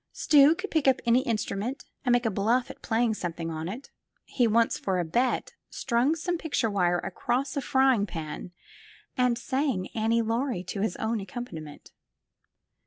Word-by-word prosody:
Stuy 300 +2 +5
could 410 +3 -6
pick 315 -4 +1
up 265 - +4
any 235 +1 +5
instrument 225 +3 -2 0.2
and 250 - +1
make 245 0 +3
a 225 - +2
bluff 225 +6 +1
at - - -15
playing 225 0 +1
something 165 -4 -4
on 160 +1 -4
it. 240 +8 -8 0.3
He 245 -3 +1
once, 230 +1 +2
for 190 -2 -1
a 175 - 0
bet, 245 - 0 0.2
strung 255 +5 +1
some 345 +1 -2
picture 270 -9 -1
wire 175 -3 +2
across 250 - -2
a 280 - 0
frying 265 -6 +3
pan 160 0 -6 0.6
and 250 -2 +2
sang 260 -6 -1
Annie 225 +1 +1
Laurie 230 -3 -1
to 195 +2 -5
his 205 -4 -1
own 220 0 -1
accompaniment. 180 -8 -8
235 Hz, 170 wpm, -27 LUFS, 195-260 Hz, 0.6 s, Stuy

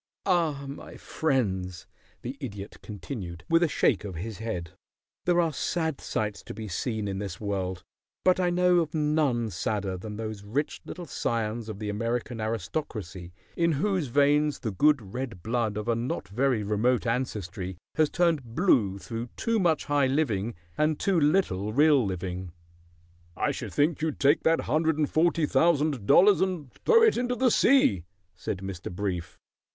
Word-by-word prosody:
Ah, 165 -7 +1
my 140 - -9
friends," 95 - -1 0.4
the 125 +3 -4
Idiot 105 -8 -7
continued, 95 -5 -7
with 165 0 +4
a 170 - +4
shake 125 -7 +2
of 100 -4 -6
his 100 +4 -6
head, 90 -8 -4 0.5
"there 175 -1 +3
are 165 -2 +2
sad 160 0 -1
sights 105 -2 -2
to - - -9
be 110 0 -6
seen 110 +3 -2
in 95 -1 -3
this 95 -4 -5
world, 95 -3 -3 0.4
but 185 0 +4
I 180 -1 +2
know 180 0 +3
of 165 0 -2
none 150 -7 +1
sadder 95 +1 -2
than 105 +3 -7
those 110 -2 -5
rich 135 +9 -2
little 180 - -7
scions 115 -5 -2
of 105 - -5
the 105 0 -5
American 115 +2 -2
aristocracy 105 - -4 0.2
in 170 -1 +2
whose 185 0 0
veins 145 +3 +2
the 110 - -2
good 115 -1 +2
red 120 -9 -5
blood 110 -2 -1
of 105 +1 -4
a 120 - +3
not 115 -4 -3
very 125 +1 +1
remote 110 +5 +1
ancestry 100 -7 -3 0.2
has 155 -2 +2
turned 155 -10 0
blue 110 - +3
through 115 +5 -5
too 230 -1 +1
much 170 -5 +2
high 145 -2 +2
living 120 -6 0 0.2
and 155 0 +2
too 195 -3 +2
little 145 - +1
real 145 0 +5
living." 90 -2 -4 0.9
"I - - +1
should - - -6
think 155 +3 +1
you'd 160 -2 -2
take 145 +3 +4
that 165 0 +3
hundred 160 0 +1
and 150 -2 +2
forty 165 0 +3
thousand 150 -8 +2
dollars 195 +2 +6
and 180 -9 -2
throw 460 -1 +4
it 445 - +5
into 245 0 0
the 255 0 +3
sea," 110 - +4 0.3
said 95 - -4
Mr. 95 -2 -6
Brief. 90 -2 -4
120 Hz, 165 wpm, -27 LUFS, 100-155 Hz, 0.9 s, dollars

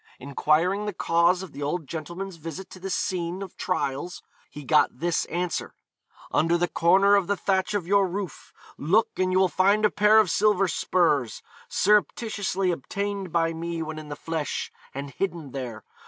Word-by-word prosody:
Enquiring 160 +9 +1
the 210 - -2
cause 170 +2 +2
of 185 - -9
the 145 - -9
old 150 +3 -2
gentleman's 170 +5 -6
visit 165 +4 -8
to 185 - -10
this 190 0 -2
scene 180 +1 -2
of 190 - -10
trials, 175 -1 -3 0.3
he 150 - -9
got 150 +3 +4
this 170 +4 0
answer: 175 0 -3 0.6
'Under 165 +2 +2
the 175 +1 +1
corner 190 +5 +4
of 200 -3 +2
the 200 - 0
thatch 190 +2 0
of 195 -5 -1
your 200 +1 +3
roof, 185 -2 -6 0.3
look 200 +10 +3
and 185 0 +2
you 185 - +2
will 190 0 +5
find 200 +4 +3
a 210 - +3
pair 210 +1 +5
of 215 -6 +5
silver 205 -2 +3
spurs, 160 -8 +1 0.3
surreptitiously 200 -2 +1
obtained 200 +4 -4
by 165 0 +1
me 165 0 -4
when 155 0 -6
in 155 -1 -10
the 145 - -4
flesh, 160 0 -3 0.2
and 140 +1 -6
hidden 165 -2 -3
there. 120 -5 -6
175 Hz, 175 wpm, -26 LUFS, 160-195 Hz, 0.6 s, will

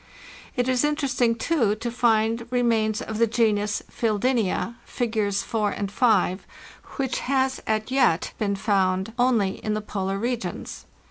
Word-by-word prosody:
It 245 -2 0
is 255 0 +2
interest 295 -4 -1
ing, 230 -1 +4
too, 230 -6 +1
to 235 +2 -4
find 230 -1 +1
remains 230 -3 +1
of 220 0 -5
the 230 - +4
genus 210 -2 +1
Fecldenza 230 0 0
(Figs. 215 -4 -1
4 215 -3 0
and 200 -1 -4
5), 205 -5 +2 0.5
which 265 -3 -1
has 265 0 0
as 220 -1 +1
yet 255 -11 +2
been 200 -2 0
found 195 0 0
only 230 -6 +2
in 215 -1 -1
the 215 - -2
polar 195 -2 -3
regions. 235 +3 -4
225 Hz, 145 wpm, -24 LUFS, 205-245 Hz, 0.5 s, ing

